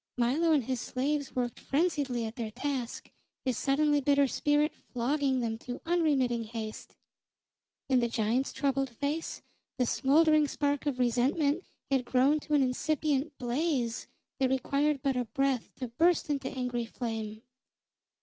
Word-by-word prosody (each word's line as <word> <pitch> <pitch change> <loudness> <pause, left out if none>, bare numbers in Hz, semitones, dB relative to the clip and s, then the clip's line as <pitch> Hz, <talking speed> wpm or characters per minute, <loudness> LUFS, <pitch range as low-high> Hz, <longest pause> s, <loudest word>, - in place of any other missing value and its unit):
Milo 275 +8 +2
and 295 -4 +4
his 255 0 -2
slaves 285 +2 -2
worked 245 -2 -2
frenziedly 275 -6 0
at 220 +1 -6
their 230 -2 -3
task, 255 +1 -4 0.3
his 255 -2 +1
suddenly 290 +3 +2
bitter 280 +1 +4
spirit 295 +3 +1 0.2
flogging 265 +1 +1
them 225 -1 -2
to 245 0 -6
unremitting 280 -9 +2
haste. 220 -1 -7 0.9
In 260 -2 +4
the 235 - +2
giant's 230 +3 0
troubled 275 -1 0
face 285 +6 -3 0.3
the 250 - +2
smoldering 305 +4 +4
spark 285 0 -1
of 275 -3 0
resentment 275 +7 +1 0.3
had 265 -2 +3
grown 265 +5 +3
to 300 0 -1
an 280 - +4
incipient 290 +2 0
blaze 245 -1 -1 0.3
that 265 -1 +3
required 275 +2 +1
but 275 -2 +1
a 250 -1 0
breath 265 +2 0
to 255 -2 -5
burst 325 +6 +2
into 275 -2 -1
angry 250 -2 -2
flame. 220 -2 -5
265 Hz, 145 wpm, -30 LUFS, 245-290 Hz, 0.9 s, and